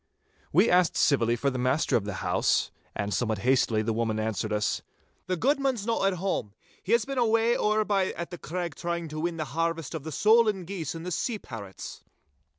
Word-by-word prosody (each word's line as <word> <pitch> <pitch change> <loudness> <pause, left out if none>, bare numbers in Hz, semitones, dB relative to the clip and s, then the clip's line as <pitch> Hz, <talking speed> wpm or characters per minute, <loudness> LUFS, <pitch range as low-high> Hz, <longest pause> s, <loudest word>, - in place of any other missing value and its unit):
We 185 +9 +5
asked 180 -4 +3
civilly 120 -5 +3
for 140 +4 0
the 130 - -3
master 130 +5 +1
of 105 - +1
the 105 -2 -4
house, - - +2 0.2
and 100 0 -2
somewhat 110 -3 0
hastily 120 -4 +3
the 115 +1 0
woman 110 -1 -1
answered 110 0 -2
us,— 105 0 0 0.5
'The 185 0 0
guidman's 270 - +1
no 230 -3 0
at 195 -1 +2
hame. 175 - -2 0.3
He 205 - -1
has 235 -2 +3
been 275 -1 -2
away 230 0 +3
ower 215 0 +2
by 195 -3 +2
at 170 +1 -6
the 175 - -7
Craig 175 -1 -4
trying 170 +2 -3
to 155 +1 -5
win 170 +1 -2
the 155 - -2
harvest 165 -2 -1
of 160 -4 -5
the 160 - -6
solan 215 0 +4
geese 170 -4 -4
and 170 +2 -4
sea 230 +7 -1
parrots. 100 - -9
165 Hz, 200 wpm, -27 LUFS, 120-200 Hz, 0.5 s, We